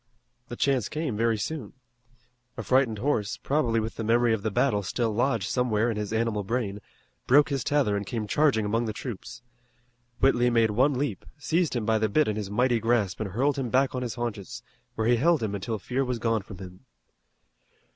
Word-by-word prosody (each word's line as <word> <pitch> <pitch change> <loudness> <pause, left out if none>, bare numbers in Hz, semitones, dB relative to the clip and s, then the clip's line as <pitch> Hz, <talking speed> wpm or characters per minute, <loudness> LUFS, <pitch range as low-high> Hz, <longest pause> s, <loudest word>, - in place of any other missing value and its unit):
The 120 - -6
chance 130 -4 +1
came 155 -7 -3
very 115 +1 +1
soon. 130 -1 -5 0.8
A 115 - -4
frightened 125 -2 +2
horse, 120 -1 -1
probably 125 -3 0
with 110 +1 -4
the 115 - -3
memory 115 +1 +3
of 110 - -1
the 110 - -1
battle 105 0 +1
still 110 +3 -1
lodged 115 -4 0
somewhere 120 0 +1
in - - -3
his 105 -1 -3
animal 110 -2 0
brain, 105 -2 -2 0.5
broke 145 +4 +5
his 135 -4 -1
tether 140 -8 +1
and 100 - -2
came 110 +2 -4
charging 120 -1 +2
among 115 +3 0
the 110 - -3
troops. 120 0 -7 0.8
Whitley 125 -2 +3
made 115 -2 +3
one 130 +6 +2
leap, 125 -7 -2
seized 160 +1 0
him 115 -3 -1
by 110 0 +2
the 110 0 +1
bit 150 +8 +2
in 105 - -1
his 105 -2 -4
mighty 120 +3 +2
grasp 115 -4 0
and 110 -3 -3
hurled 140 +8 0
him 125 -3 -2
back 130 +3 +2
on 130 - -3
his 120 -4 -4
haunches, 110 -6 -5 0.3
where 110 - -1
he 120 +1 +4
held 160 +1 +2
him 105 -2 -2
until 100 +3 -3
fear 125 +6 -2
was 125 -2 -2
gone 115 -2 0
from 95 -1 -11
him. 90 -1 -11
115 Hz, 205 wpm, -27 LUFS, 105-130 Hz, 0.8 s, broke